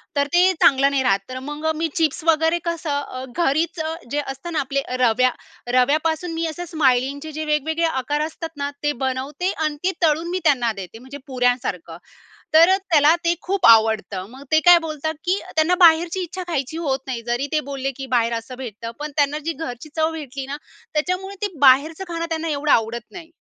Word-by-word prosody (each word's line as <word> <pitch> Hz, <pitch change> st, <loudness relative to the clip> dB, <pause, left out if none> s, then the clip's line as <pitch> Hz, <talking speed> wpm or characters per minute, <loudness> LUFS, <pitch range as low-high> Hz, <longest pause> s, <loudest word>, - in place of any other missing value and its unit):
तर 285 Hz, 0 st, +2 dB
ते 360 Hz, +2 st, +5 dB
चांगलं 275 Hz, +1 st, +5 dB
नाही 275 Hz, -1 st, +1 dB
राहत. 195 Hz, -5 st, +3 dB
तर 255 Hz, 0 st, -5 dB
मग 295 Hz, +1 st, -6 dB
मी 325 Hz, +1 st, -1 dB
चिप्स 320 Hz, 0 st, 0 dB
वगैरे 325 Hz, +1 st, +3 dB
कसं 325 Hz, -4 st, -2 dB
अ, 255 Hz, -2 st, -7 dB, 0.2 s
घरीचं 315 Hz, +2 st, 0 dB, 0.2 s
जे 295 Hz, -, 0 dB
असतं 270 Hz, +6 st, -6 dB
ना 310 Hz, -, +1 dB
आपले 275 Hz, 0 st, -1 dB, 0.2 s
रव्या 250 Hz, +1 st, +3 dB, 0.4 s
रव्यापासून 315 Hz, +6 st, +1 dB
मी 330 Hz, 0 st, -2 dB
असं 320 Hz, +3 st, -5 dB
स्माइलिंगचे 285 Hz, -1 st, 0 dB
जे 310 Hz, +1 st, -4 dB
वेगवेगळे 310 Hz, +2 st, 0 dB
आकार 295 Hz, -1 st, -1 dB
असतात 320 Hz, +1 st, -4 dB
ना, 285 Hz, 0 st, -2 dB
ते 295 Hz, -, +2 dB
बनवते 275 Hz, +8 st, -2 dB
आणि 305 Hz, -1 st, -1 dB
ते 375 Hz, -, +2 dB
तळून 325 Hz, +1 st, +2 dB
मी 365 Hz, +1 st, -1 dB
त्यांना 250 Hz, -7 st, +3 dB
देते, 195 Hz, +2 st, -9 dB
म्हणजे 260 Hz, +3 st, -10 dB
पुऱ्यांसारखं, 245 Hz, -10 st, -1 dB, 0.6 s
तर 335 Hz, +4 st, +7 dB
त्याला 310 Hz, -1 st, +5 dB
ते 340 Hz, -, +4 dB
खूप 385 Hz, 0 st, 0 dB
आवडतं. 220 Hz, -4 st, +4 dB
मग 265 Hz, +3 st, -12 dB
ते 315 Hz, -, +5 dB
काय 350 Hz, 0 st, +9 dB
बोलतात 315 Hz, -1 st, -4 dB
की 370 Hz, +3 st, +1 dB, 0.2 s
त्यांना 320 Hz, +3 st, +3 dB
बाहेरची 335 Hz, +3 st, +3 dB
इच्छा 365 Hz, +2 st, -6 dB
खायची 315 Hz, -2 st, -3 dB
होत 275 Hz, -5 st, -1 dB
नाही. 250 Hz, -3 st, -3 dB
जरी 240 Hz, +4 st, 0 dB
ते 310 Hz, -, +2 dB
बोलले, 270 Hz, 0 st, -2 dB
"की 270 Hz, -, -5 dB
बाहेर 235 Hz, -2 st, +1 dB
असं 230 Hz, +2 st, -5 dB
भेटतं", 230 Hz, -3 st, -7 dB
पण 300 Hz, 0 st, -5 dB
त्यांना 290 Hz, +1 st, +2 dB
जी 330 Hz, -, -1 dB
घरची 265 Hz, -2 st, -7 dB
चव 320 Hz, 0 st, +1 dB
भेटली 280 Hz, -4 st, -6 dB
ना, 280 Hz, +1 st, -5 dB, 0.4 s
त्याच्यामुळे 365 Hz, +5 st, -2 dB
ते 405 Hz, -, -5 dB
बाहेरचं 285 Hz, +6 st, +4 dB
खाणं 335 Hz, -1 st, -3 dB
त्यांना 325 Hz, 0 st, -2 dB
एवढं 295 Hz, 0 st, 0 dB
आवडत 230 Hz, +1 st, +2 dB
नाही. 335 Hz, -3 st, -11 dB
295 Hz, 190 wpm, -21 LUFS, 260-325 Hz, 0.6 s, काय